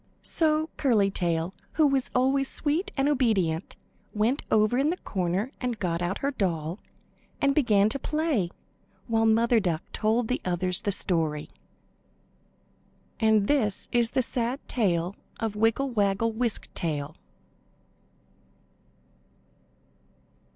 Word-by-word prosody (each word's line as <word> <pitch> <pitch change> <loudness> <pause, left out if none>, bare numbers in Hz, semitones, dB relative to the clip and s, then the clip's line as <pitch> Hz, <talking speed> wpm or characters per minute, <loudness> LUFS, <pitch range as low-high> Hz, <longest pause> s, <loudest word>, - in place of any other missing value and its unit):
So 315 -1 +2
Curly 215 -8 +3
Tail, 170 -1 -1 0.2
who 310 - +4
was 275 -2 +1
always 270 +2 +2
sweet 330 +7 -1
and 270 +1 +2
obedient, 205 - +1 0.4
went 230 +7 +1
over 215 +3 +3
in 285 +3 +2
the 355 - -1
corner 190 - -2
and 250 -3 -2
got 175 -4 -2
out 175 +2 -1
her 280 - +1
doll, 175 - -2 0.6
and 275 0 +3
began 215 -8 +3
to 275 - -4
play, 300 - 0 0.6
while 225 -1 +2
Mother 230 +1 +4
Duck 175 -5 -1
told 220 +2 +1
the 250 - -1
others 180 0 -1
the 205 - -1
story. 160 -6 0 1.7
And 220 -2 +3
this 220 -9 +1
is 240 -1 +2
the 260 - +4
sad 240 +3 -2
tale 180 -5 0 0.2
of 220 -2 -2
Wiggle 225 +5 +1
Waggle 205 0 +1
Wisk 230 0 -1
Tail. 150 -2 -3
220 Hz, 125 wpm, -27 LUFS, 185-260 Hz, 1.7 s, who